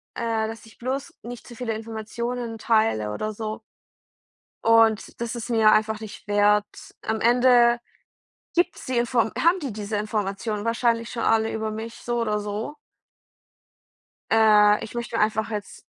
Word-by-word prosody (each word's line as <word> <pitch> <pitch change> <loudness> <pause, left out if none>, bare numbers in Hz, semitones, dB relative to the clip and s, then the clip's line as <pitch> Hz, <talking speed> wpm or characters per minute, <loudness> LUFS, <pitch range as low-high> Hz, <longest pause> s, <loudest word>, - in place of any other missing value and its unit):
äh, 225 -2 -1
dass 225 0 -9
ich 225 - -17
bloß 270 +6 -4
nicht 245 0 -9
zu 240 - -11
viele 235 -2 -3
Informationen 225 +2 -5
teile 215 - +1
oder 215 - -3
so. 215 +1 -5 1.0
Und 225 -1 +3
das 235 0 -3
ist 235 0 -6
mir 220 -2 +5
einfach 220 0 +2
nicht 215 -1 -10
wert. 205 0 +3 0.4
Am 220 0 -2
Ende 240 0 +5 0.8
gibt 350 +1 +2
es - - -10
die 255 -1 -1
Inform 235 -2 +1
haben 340 +3 +3
die 275 -5 -3
diese 210 0 -4
Informationen 210 0 -2
wahrscheinlich 230 0 +1
schon 235 - -4
alle 225 0 +2
über 220 0 -3
mich, 225 +2 -6
so 240 0 -3
oder 210 -2 0
so? 210 +7 -4 1.6
Äh, 210 -2 +5
ich 225 - -10
möchte 235 -1 -4
mir - - +2
einfach 220 +1 0
jetzt 210 -2 -6
225 Hz, 160 wpm, -24 LUFS, 215-235 Hz, 1.6 s, mir